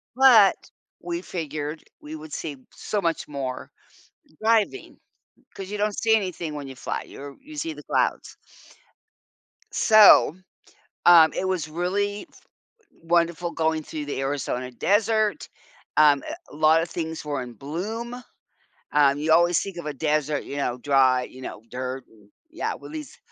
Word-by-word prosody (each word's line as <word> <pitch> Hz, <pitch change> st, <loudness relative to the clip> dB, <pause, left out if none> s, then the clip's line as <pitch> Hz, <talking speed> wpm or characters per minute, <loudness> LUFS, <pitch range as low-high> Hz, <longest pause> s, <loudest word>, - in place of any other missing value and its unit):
but 245 Hz, -7 st, +7 dB, 0.5 s
we 170 Hz, 0 st, -3 dB
figured 155 Hz, -3 st, -5 dB, 0.2 s
we 155 Hz, +1 st, -8 dB
would 155 Hz, 0 st, -10 dB
see 145 Hz, -2 st, -5 dB
so 205 Hz, -2 st, -3 dB
much 165 Hz, -2 st, -1 dB
more 135 Hz, -3 st, -5 dB, 0.7 s
driving 225 Hz, -, +1 dB, 0.5 s
'cause 195 Hz, 0 st, -8 dB
you 210 Hz, -, -4 dB
don't 210 Hz, 0 st, -1 dB
see 225 Hz, -1 st, +4 dB
anything 180 Hz, -6 st, -3 dB
when 140 Hz, -2 st, -6 dB
you 135 Hz, -, -9 dB
fly -, -, -4 dB
you're 140 Hz, 0 st, -10 dB
you 305 Hz, +1 st, -12 dB
see 320 Hz, +2 st, -3 dB
the -, -, -12 dB
clouds. -, -, -1 dB, 1.3 s
So, 215 Hz, -6 st, +7 dB, 0.7 s
um, 165 Hz, -3 st, +8 dB
it 190 Hz, -, -2 dB
was 175 Hz, -5 st, -1 dB
really 200 Hz, -, -2 dB
f -, -, -20 dB, 0.6 s
wonderful 170 Hz, 0 st, +1 dB
going 160 Hz, -1 st, 0 dB
through 150 Hz, -1 st, -6 dB
the 140 Hz, -, -3 dB
Arizona 130 Hz, -2 st, -3 dB
Desert. 215 Hz, -, +1 dB, 0.5 s
Um, 145 Hz, -3 st, +5 dB, 0.3 s
a 145 Hz, -, -12 dB
lot 155 Hz, +1 st, +4 dB
of 170 Hz, -, -4 dB
things 160 Hz, -2 st, -5 dB
were 145 Hz, -3 st, -3 dB
in 120 Hz, -1 st, -9 dB
bloom. 210 Hz, -, -5 dB, 0.8 s
Um, 145 Hz, -1 st, +4 dB
you 155 Hz, +2 st, +1 dB
always 175 Hz, +1 st, +4 dB
think 195 Hz, -3 st, -6 dB
of 170 Hz, -, -7 dB
a 150 Hz, -, -2 dB
desert, 150 Hz, 0 st, -1 dB
you 140 Hz, -, -7 dB
know, 125 Hz, -3 st, -2 dB
dry 130 Hz, -2 st, +3 dB
you 130 Hz, +1 st, -12 dB
know 110 Hz, -, -8 dB
dirt, 130 Hz, +1 st, -5 dB
and 105 Hz, -2 st, -23 dB, 0.2 s
yeah, 330 Hz, -, -3 dB
well -, -, -11 dB
these 305 Hz, -4 st, -8 dB
160 Hz, 155 wpm, -24 LUFS, 145-200 Hz, 1.3 s, um